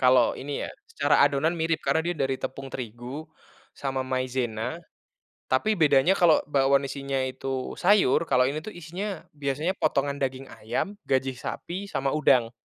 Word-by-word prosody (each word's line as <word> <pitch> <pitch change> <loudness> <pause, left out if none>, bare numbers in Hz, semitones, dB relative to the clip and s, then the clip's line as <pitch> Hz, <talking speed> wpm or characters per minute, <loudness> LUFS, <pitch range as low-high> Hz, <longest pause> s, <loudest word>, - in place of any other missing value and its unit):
Kalau 125 -2 +5
ini 140 +1 -4
ya - - -5 0.2
secara 460 - +3
adonan 150 +4 +2
mirip 165 -1 0
karena 160 - +2
dia 175 +1 -1
dari 135 -2 0
tepung 135 0 -6
terigu, 125 +5 -6 0.5
sama 135 -1 -2
maizena, 130 +1 -2 0.7
tapi 215 +12 +2
bedanya 150 +1 +5
kalau 170 -4 +6
bakwan 140 -1 +3
isinya 140 0 -3
itu 130 0 -4
sayur, 190 -5 +4
kalau 125 0 +4
ini 150 +4 -1
tuh 215 - -7
isinya 175 +3 -5
biasanya 145 +5 -1
potongan 140 -2 +1
daging 135 0 -2 0.2
ayam, 120 - -2 0.2
gajih 130 0 +1
sapi, 190 +9 -5
sama 135 -5 -1
udang. 125 -6 +3
140 Hz, 150 wpm, -26 LUFS, 130-160 Hz, 0.7 s, kalau